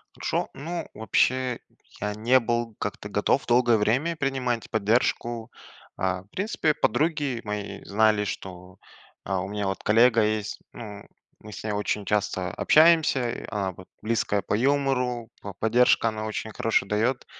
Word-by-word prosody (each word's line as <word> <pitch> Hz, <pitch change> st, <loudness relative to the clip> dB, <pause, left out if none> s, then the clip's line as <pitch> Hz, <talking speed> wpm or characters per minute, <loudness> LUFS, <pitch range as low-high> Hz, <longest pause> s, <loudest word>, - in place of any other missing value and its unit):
Хорошо. -, -, -2 dB
Ну 165 Hz, +5 st, -5 dB
вообще 125 Hz, +3 st, +1 dB, 0.4 s
я 105 Hz, 0 st, -1 dB
не 120 Hz, +4 st, +4 dB
был 120 Hz, -1 st, -2 dB
как-то -, -, -5 dB
готов -, -, +1 dB
долгое 120 Hz, -1 st, +4 dB
время 130 Hz, +11 st, +1 dB
принимать 130 Hz, -5 st, -2 dB
поддержку. 115 Hz, +1 st, 0 dB, 0.5 s
А, 95 Hz, 0 st, -1 dB
в -, -, -29 dB
принципе 185 Hz, -, 0 dB
подруги 145 Hz, -2 st, 0 dB
мои 105 Hz, -1 st, -5 dB
знали, 105 Hz, 0 st, +3 dB
что, 90 Hz, -2 st, -7 dB, 0.5 s
э, 95 Hz, -, -3 dB
у 95 Hz, 0 st, -1 dB
меня 105 Hz, 0 st, -3 dB
вот 95 Hz, -, -3 dB
коллега 115 Hz, +1 st, +5 dB
есть, 105 Hz, -1 st, -1 dB
ну, 105 Hz, -3 st, -9 dB, 0.4 s
мы 105 Hz, -, -11 dB
с -, -, -8 dB
ней 110 Hz, -, -2 dB
очень 105 Hz, 0 st, -2 dB
часто 95 Hz, -4 st, -1 dB
общаемся, 155 Hz, -6 st, +3 dB
она, 100 Hz, -3 st, -2 dB
вот, 90 Hz, +1 st, -14 dB
близкая 110 Hz, -2 st, 0 dB
по -, -, -3 dB
юмору, 125 Hz, -2 st, 0 dB
п 100 Hz, -, -7 dB
поддержка 115 Hz, +1 st, +3 dB
она 110 Hz, 0 st, -5 dB
очень 110 Hz, 0 st, -4 dB
хорошо 110 Hz, -1 st, +1 dB
дает. 115 Hz, +6 st, 0 dB
110 Hz, 150 wpm, -26 LUFS, 105-125 Hz, 0.5 s, коллега